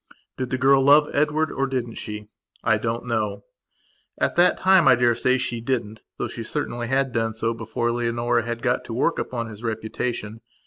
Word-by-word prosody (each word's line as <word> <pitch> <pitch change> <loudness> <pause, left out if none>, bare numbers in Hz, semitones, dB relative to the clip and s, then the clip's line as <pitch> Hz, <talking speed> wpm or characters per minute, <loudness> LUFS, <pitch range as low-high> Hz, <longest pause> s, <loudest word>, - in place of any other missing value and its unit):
Did 130 -1 -4
the 130 - -1
girl 135 +1 +4
love 145 +2 +5
Edward, 150 +2 +1
or 135 - -1
didn't 125 -3 -3
she? 105 -1 -6 0.4
I 110 -2 +3
don't 115 +2 -3
know. 105 -4 -2 0.8
At - - 0
that 175 +1 +4
time 190 -2 +5
I - - +8
daresay 120 +1 +2
she 120 -2 -2
didn't 115 -3 -2 0.2
though - - -2
she 115 - -7
certainly 120 -1 -3
had 135 +1 +1
done 115 -1 -1
so 115 +1 -1
before 115 +1 -2
Leonora 120 0 0
had 115 0 -5
got 125 - +1
to 115 - -6
work 165 +7 +1
upon 120 -2 -3
his 110 -2 -10
reputation. 110 0 -4
120 Hz, 185 wpm, -23 LUFS, 115-130 Hz, 0.8 s, I